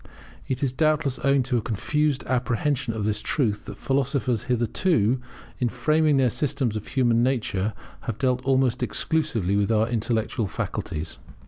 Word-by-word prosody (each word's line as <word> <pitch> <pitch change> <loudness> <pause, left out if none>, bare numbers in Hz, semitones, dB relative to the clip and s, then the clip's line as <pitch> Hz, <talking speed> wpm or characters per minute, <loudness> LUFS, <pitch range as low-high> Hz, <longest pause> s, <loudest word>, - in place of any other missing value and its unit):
It 130 +1 -2
is 130 -2 +1
doubtless, 155 -2 +1
owing 140 -1 +4
to 125 0 0
a - - 0
confused 145 +6 0
apprehension 125 0 0
of 105 -2 -2
this 105 -1 0
truth, 105 -3 0
that - - -8
philosophers 135 -4 0
hitherto, 125 - +1 0.4
in 125 - +1
framing 155 +2 +2
their 130 -3 +3
systems 130 -2 -1
of 110 - -5
human 120 -4 +2
nature, 110 -5 0 0.3
have 115 -3 -2
dealt 125 -2 +1
almost 130 -2 +2
exclusively, 125 - 0
with 100 +2 +2
our 110 0 +3
intellectual 115 -1 -1
faculties. 80 -3 -4
125 Hz, 150 wpm, -25 LUFS, 110-140 Hz, 0.4 s, owing